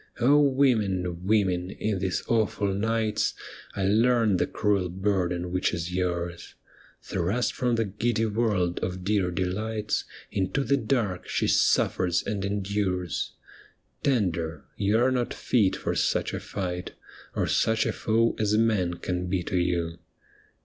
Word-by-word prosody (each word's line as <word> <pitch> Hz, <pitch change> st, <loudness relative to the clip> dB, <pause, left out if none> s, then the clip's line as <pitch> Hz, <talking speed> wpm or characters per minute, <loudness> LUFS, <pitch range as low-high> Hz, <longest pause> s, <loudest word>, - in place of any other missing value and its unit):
women, 120 Hz, -10 st, +2 dB
women, 95 Hz, -4 st, +2 dB
in 105 Hz, 0 st, -2 dB
these 90 Hz, 0 st, -1 dB
awful 105 Hz, -3 st, +1 dB
nights 110 Hz, +1 st, 0 dB, 0.4 s
1 100 Hz, +3 st, +2 dB
learned 115 Hz, -6 st, +3 dB
the -, -, +1 dB
cruel 100 Hz, -4 st, 0 dB
burden 90 Hz, -2 st, -1 dB
which 90 Hz, 0 st, 0 dB
is 85 Hz, +1 st, -4 dB
yours! 85 Hz, -1 st, -3 dB, 0.5 s
Thrust 105 Hz, +7 st, -1 dB
from 125 Hz, -2 st, 0 dB
the 115 Hz, -1 st, +1 dB
giddy 110 Hz, +3 st, 0 dB
world 105 Hz, -5 st, 0 dB
of 90 Hz, 0 st, -4 dB
dear 100 Hz, -2 st, +1 dB
delights 105 Hz, +4 st, -2 dB, 0.3 s
Into 100 Hz, +8 st, 0 dB
the 140 Hz, -, +2 dB
dark, 110 Hz, -8 st, -1 dB
she -, -, 0 dB
suffers 90 Hz, -2 st, +2 dB
and 100 Hz, -2 st, -2 dB
endures. 100 Hz, -3 st, -1 dB, 0.7 s
Tender, 85 Hz, -, 0 dB
you 105 Hz, +2 st, +2 dB
arc 125 Hz, +2 st, +3 dB
not 125 Hz, -2 st, -1 dB
fit 105 Hz, -7 st, +2 dB
for -, -, -2 dB
such -, -, 0 dB
a -, -, -2 dB
fight 90 Hz, -2 st, -4 dB, 0.4 s
Or -, -, +1 dB
such 110 Hz, 0 st, +2 dB
a -, -, 0 dB
foe 115 Hz, +1 st, +1 dB
as 105 Hz, 0 st, +2 dB
man 105 Hz, -6 st, +2 dB
can 90 Hz, +1 st, -3 dB
be 90 Hz, -1 st, -1 dB
to 95 Hz, -, -4 dB
you. 85 Hz, -1 st, -1 dB
100 Hz, 140 wpm, -27 LUFS, 90-110 Hz, 0.7 s, learned